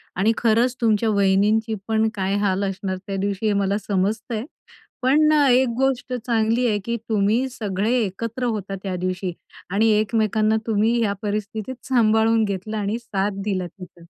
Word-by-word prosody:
आणि 195 +5 +3
खरंच 235 +2 +2
तुमच्या 225 -1 +2
वहिनींची 210 +2 +2
पण 220 0 +2
काय 195 0 -1
हाल 195 0 +1
असणार 195 -1 -3
त्या 195 - -3
दिवशी, 200 +2 -2
हे 210 - +3
मला 200 +1 +1
समजतं 210 +3 -2
आहे. 215 - -3 0.6
पण 300 +4 +4
अ, 295 -2 +4
एक 255 +1 +4
गोष्ट 265 -1 0
चांगली 230 0 +1
आहे, 210 -2 +1
की 235 - -1
तुम्ही 220 +4 +2
सगळे 210 -3 -2
एकत्र 230 +5 -4
होता 195 -1 -5
त्या 190 -2 -3
दिवशी. 185 0 -2 0.4
आणि 210 +4 +2
एकमेकांना 215 0 +1
तुम्ही 220 +2 +2
ह्या 205 -3 +1
परिस्थितीत 210 +3 -3
सांभाळून 225 -2 +3
घेतलं 200 +1 -3
आणि 210 +2 -1
साथ 200 -3 -2
दिला 185 -3 -1
तिचा. 180 -2 -14
215 Hz, 160 wpm, -22 LUFS, 195-230 Hz, 0.6 s, पण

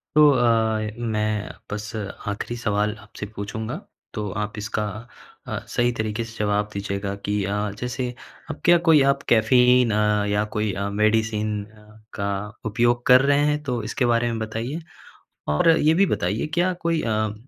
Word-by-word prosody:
तो 150 -1 +8
अ, 110 -3 +2
मैं 110 -2 -1 0.2
बस 105 0 -4
आख़िरी 105 +2 -5
सवाल 105 -2 0
आपसे 105 0 -9
पूछूँगा, 110 +2 -4 0.4
तो 105 -1 -3
आप 105 0 -3
इसका 105 +1 -2 0.6
अ, - - -3
सही 120 0 +1
तरीके 110 +1 -1
से 115 0 -11
जवाब 105 0 0
दीजिएगा 100 0 -3
कि 105 -1 0
अ, 105 +1 -1
जैसे 125 +1 -3 0.4
अब - - -5
क्या 175 0 +7
कोई 155 -3 +7
आप 140 - -3
कैफ़ीन 125 +1 +5
अ, 105 -1 +2
या 105 +1 +1
कोई 105 -1 0
अ, 100 +1 -2
मेडिसिन 105 0 +1
अ, 105 0 -19
का 100 -1 -2 0.4
उपयोग 120 +2 +1
कर 125 +1 +7
रहे 140 +1 +3
हैं, 150 0 +1
तो 125 -5 -2
इसके 120 +4 -1
बारे 120 0 +2
में 115 - -3
बताइए। 115 +8 -4 0.7
और 75 - +3
ये 160 -1 +4
भी 195 +3 +4
बताइए 100 - -1
क्या 180 +1 +2
कोई 165 -1 +1
अ, 110 -2 -1
110 Hz, 165 wpm, -23 LUFS, 105-120 Hz, 0.7 s, तो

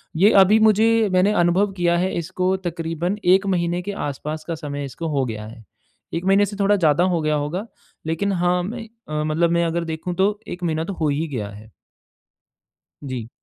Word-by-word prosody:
ये 195 +7 +5
अभी 205 +3 +5
मुझे 220 0 +4
मैंने 185 +3 +4
अनुभव 185 +4 +2
किया 175 -1 +2
है 185 +2 0
इसको 185 +2 -1
तकरीबन 170 +3 -2
1 190 +2 +5
महीने 175 0 -1
के 200 +3 -5 0.2
आस-पास 150 +2 -5
का 165 - -2
समय 145 -2 -5
इसको 165 +5 -6
हो 135 - +2
गया 110 -3 -5
है। 115 +1 -12 0.5
1 170 +2 -3
महीने 195 +1 +4
से 205 +1 -7
थोड़ा 200 +1 +4
ज़्यादा 165 -3 +3
हो 165 - 0
गया 155 0 +1
होगा, 150 +8 -2 0.4
लेकिन 165 +6 -1
हाँ 180 -1 +1
मैं 225 +4 -6 0.2
अ, 150 0 -1
मतलब 160 +2 +1
मैं 170 0 +2
अगर 170 +1 -1
देखूँ 165 +2 -4
तो 205 +3 +1
1 180 - -7
महीना 160 -2 0
तो 195 - -5
हो 160 -4 -1
ही 150 +3 -1
गया 115 -9 -4
है। 105 +2 -13 1.3
जी। 130 -5 -5
170 Hz, 195 wpm, -22 LUFS, 155-190 Hz, 1.3 s, ये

